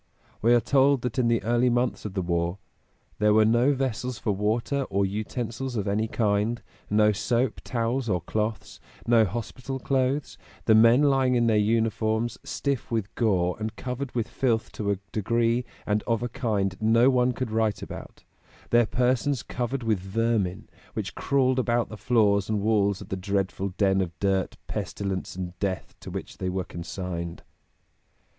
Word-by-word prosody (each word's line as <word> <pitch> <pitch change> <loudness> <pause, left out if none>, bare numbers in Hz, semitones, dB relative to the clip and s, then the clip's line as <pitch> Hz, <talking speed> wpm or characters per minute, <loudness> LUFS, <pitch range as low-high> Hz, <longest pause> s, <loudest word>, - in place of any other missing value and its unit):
We 120 +2 +5
are - - +5
told 135 +1 +3
that 125 0 -2
in 120 - +3
the 115 -1 +2
early 120 +2 +2
months 120 -1 0
of 105 -2 -5
the 95 - 0
war 85 +1 -1 0.6
"there 105 0 +4
were 110 0 +6
no 120 +5 +4
vessels 125 -2 -2
for 105 - -1
water 115 +7 0
or 100 +1 +1
utensils 115 +5 -4
of 105 -2 -1
any 105 +3 +1
kind; 110 +1 0 0.3
no 105 0 +4
soap, 120 +4 0
towels 120 +1 -1
or 90 -3 +2
cloths, 105 +4 -3 0.3
no 115 -2 +5
hospital 120 +6 -5
clothes; 135 +2 -1 0.3
the 110 - +5
men 115 +5 +6
lying 135 -3 +3
in 120 -1 +3
their 115 -2 +3
uniforms, 110 +1 +1
stiff 140 -2 -2
with 110 -3 -2
gore 90 -6 +1
and 110 0 -4
covered 125 +1 -5
with 115 -2 0
filth 115 -4 0
to 105 -2 -3
a 100 - +1
degree 115 +3 +1 0.2
and 105 0 +1
of 115 0 +1
a 120 - -2
kind 100 -6 -1
no 115 +4 +5
one 125 0 +3
could 125 -2 -4
write 110 -1 0
about; - - -9 0.5
their 120 -1 +5
persons 125 +2 +1
covered 125 +1 -3
with 110 -4 +1
vermin, 100 -1 -1 0.3
which 100 -2 -3
crawled 130 -2 +1
about 120 -2 +1
the 110 - -7
floors 105 -4 +2
and 105 -2 0
walls 100 -2 +2
of - - -10
the - - -2
dreadful 95 0 -1
den 95 -2 +3
of 85 -3 -4
dirt, 95 -2 0
pestilence 95 -3 -4
and 90 -1 -6
death 95 -2 -3
to - - -9
which - - -7
they 95 - -1
were 95 0 -2
consigned." 85 -1 -5
110 Hz, 170 wpm, -26 LUFS, 100-120 Hz, 0.6 s, were